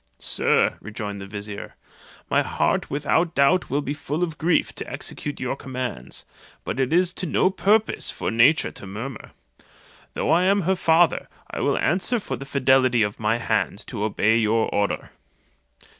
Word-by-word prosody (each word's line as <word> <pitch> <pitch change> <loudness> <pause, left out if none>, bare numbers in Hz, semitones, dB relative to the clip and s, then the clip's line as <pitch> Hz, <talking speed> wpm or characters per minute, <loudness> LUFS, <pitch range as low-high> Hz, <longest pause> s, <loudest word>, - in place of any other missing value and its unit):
"Sir," - - +1
rejoined 105 -2 -6
the 95 - -7
vizier 100 +1 -7 0.5
"my - - +3
heart - - 0
without 160 +4 0
doubt 155 +7 +3
will 140 +2 0
be 140 - -2
full 150 +3 -3
of 165 -4 -4
grief 165 +1 +1
to - - -5
execute 145 - -4
your 130 +1 -2
commands; 125 - -6 0.4
but 130 - -4
it 130 +1 +1
is 180 +1 +3
to 185 - -3
no 185 - +2
purpose 210 +4 +2
for - - -3
nature 120 +8 +4
to 100 - -10
murmur. 115 +6 -7 0.9
Though - - 0
I 175 +3 +4
am 200 +1 +3
her 190 +2 +1
father, 165 -1 +3 0.2
I - - -4
will - - +1
answer 190 +8 +1
for - - -4
the 140 - -8
fidelity 130 -3 +3
of 105 0 -3
my 110 +1 +1
hand 115 - -1
to 105 - -4
obey 110 +1 +2
your 110 0 +1
order." 100 0 -1
135 Hz, 170 wpm, -23 LUFS, 110-170 Hz, 0.9 s, nature